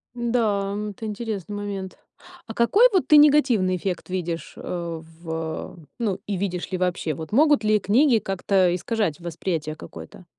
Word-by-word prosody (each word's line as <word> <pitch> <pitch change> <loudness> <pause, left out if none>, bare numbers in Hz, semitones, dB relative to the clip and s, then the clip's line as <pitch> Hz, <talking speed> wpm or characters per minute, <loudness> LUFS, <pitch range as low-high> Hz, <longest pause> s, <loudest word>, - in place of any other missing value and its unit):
М-да, 225 -5 0
м. 210 +1 -3
Это 220 +3 -8
интересный 210 -2 -4
момент. 200 -2 -5 0.5
А 225 - -6
какой 395 - +5
вот 370 - +3
ты 300 - +7
негативный 265 -11 +5
эффект 180 0 -4
видишь, 170 -3 -4
а, 170 -2 -5
в 165 +1 -14
а, 160 0 -4 0.2
ну 200 -5 -1
и 200 -2 -2
видишь 180 -2 -3
ли 185 - -1
вообще, 180 -3 -1
вот 160 +5 -8
могут 295 0 +4
ли 215 0 +4
книги 235 +5 +3
как-то, 195 -1 +1
э, 175 - +1
искажать 205 -4 -1
восприятие 165 -2 -3
какое-то? 175 - -11
195 Hz, 170 wpm, -24 LUFS, 175-225 Hz, 0.5 s, ты